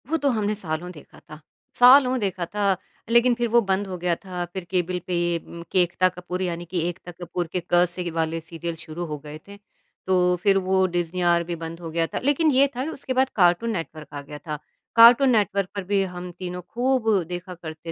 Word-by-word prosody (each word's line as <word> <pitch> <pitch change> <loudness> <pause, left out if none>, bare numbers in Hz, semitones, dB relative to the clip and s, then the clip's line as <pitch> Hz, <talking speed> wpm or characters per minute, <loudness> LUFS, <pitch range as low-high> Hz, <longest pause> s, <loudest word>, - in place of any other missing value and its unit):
वो 325 - +1
तो 285 -3 +1
हमने 215 -2 0
सालों 175 -2 -4
देखा 150 -5 -15
था 155 0 -10 0.4
सालों 255 +1 +7
देखा 190 -4 -2
था 200 +1 0 0.3
लेकिन 235 +1 +5
फ़िर 240 0 0
वो 235 +2 +5
बंद 195 -1 -1
हो 185 -1 -5
गया 175 0 0
था। 180 -1 -6
फ़िर 175 +2 -7
केबल 180 -1 0
पे 180 - -2
ये 175 0 +1
उम, 170 +1 -11
के 185 - +4
एकता 180 +1 +1
कपूर 180 0 -6
यानी 175 -2 -3
कि 175 0 -2
एकता 175 0 -9
कपूर 175 0 -5
के 180 - -1
क 175 0 +6
से 175 0 -4
वाले 165 0 -1
सीरियल 165 +1 -6
शुरू 165 +2 -7
हो 150 -2 -5
गए 150 +1 -9
थे। 200 0 -11 0.5
तो 180 -1 +3
फ़िर 195 -1 +4
वो 190 0 +2
डिज़नी 175 0 -2
आर 170 -1 +3
भी 170 0 -4
बंद 165 0 -7
हो 170 -2 -7
गया 165 0 0
था - - -4
लेकिन 290 +3 +3
ये 275 +1 +5
था 255 - -2
कि 300 - -3
उसके 265 -3 -5
बाद 260 +1 +2
कार्टून 180 +4 +3
नेटवर्क 165 -5 -5
आ 145 - -5
गया 150 +1 -9
था। 150 +1 -6 0.4
कार्टून 235 +4 +8
नेटवर्क 200 -5 +1
पर 200 - -3
भी 200 +1 +1
हम 180 -1 -6
तीनों 180 -1 -5
ख़ूब 245 +4 0 0.2
देखा 180 +1 -6
करते 165 -1 -8
180 Hz, 225 wpm, -24 LUFS, 170-205 Hz, 0.5 s, कार्टून